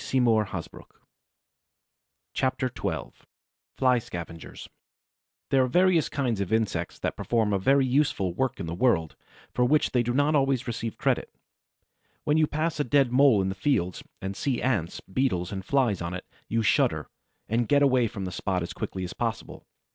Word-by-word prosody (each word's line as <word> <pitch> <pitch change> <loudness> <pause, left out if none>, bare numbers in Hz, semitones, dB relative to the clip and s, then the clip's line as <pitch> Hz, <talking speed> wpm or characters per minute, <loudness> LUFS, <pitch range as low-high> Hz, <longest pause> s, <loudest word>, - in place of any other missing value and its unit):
CHAPTER 130 -1 0
XII - - -3 0.7
FLY 130 -2 +3
SCAVENGERS 85 -6 -8 0.8
There 135 -1 +4
are - - +1
various 175 +3 +3
kinds 125 -7 -1
of 100 - -3
insects 110 -2 -1
that - - -3
perform 110 -3 0
a 100 - +1
very 135 +7 +3
useful 125 - +1
work 130 +4 -1
in 95 - -3
the 80 - -4
world, 85 -6 +1 0.4
for 125 - +2
which 145 +5 +3
they 125 - +2
do 120 +1 -1
not 145 +2 +3
always 135 -3 +2
receive 115 -1 -4
credit. - - 0 0.9
When 150 +1 +2
you 155 -1 +4
pass 155 +1 -2
a - - +3
dead 135 -1 +2
Mole 125 -6 +5
in 95 - -1
the - - -2
fields, 95 - 0 0.2
and 95 +1 -3
see 130 +1 -1
Ants, 100 -10 -1
Beetles 95 -5 -1
and 95 -2 -4
Flies 120 -6 +1
on 85 +1 -3
it, 90 - -7 0.2
you 115 0 0
shudder 95 - +2 0.4
and 115 +1 0
get 145 +3 +4
away 130 -4 +3
from 100 -3 -6
the 90 - -4
spot 90 0 -2
as 85 - -6
quickly 95 - -5
as 90 - -5
possible. - - -4
120 Hz, 170 wpm, -27 LUFS, 95-135 Hz, 0.9 s, Mole